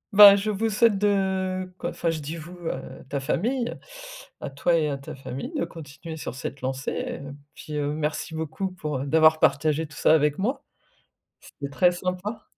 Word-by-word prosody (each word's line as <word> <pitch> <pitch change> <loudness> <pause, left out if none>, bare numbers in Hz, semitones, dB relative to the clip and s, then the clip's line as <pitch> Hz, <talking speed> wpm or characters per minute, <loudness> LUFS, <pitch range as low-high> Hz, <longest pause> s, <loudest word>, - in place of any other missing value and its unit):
Ben, 200 -1 +11
je 205 +2 -1
vous 215 +2 0
souhaite 215 0 +4
de, 190 -2 0
quoi, - - -3
enfin 170 - -1
je 160 -1 -2
dis: 155 +4 -5
«Vous», 170 +3 -9 0.2
heu, 130 - -7
ta 140 - -1
famille, 235 - -1 0.7
à - - -4
toi 155 +5 +2
et 155 -2 +1
à 140 - -2
ta 135 - -9
famille, 135 - -6
de - - 0
continuer 160 +1 -9
sur 150 - -6
cette 135 0 -6
lancée 130 +1 -2
et, - - -3
heu, 140 0 -8 0.2
puis 150 -1 -6
merci 150 +2 -2
beaucoup 160 +4 -3
pour 150 -6 -4
d'avoir 155 +3 +5
partagé 155 +3 +2
tout 150 - -14
ça - - +5
avec 150 -2 +3
moi. 260 +8 -1 0.8
C'était 140 -1 -8
très 180 +4 +4
sympa. 185 +5 -4
160 Hz, 185 wpm, -25 LUFS, 145-190 Hz, 0.8 s, Ben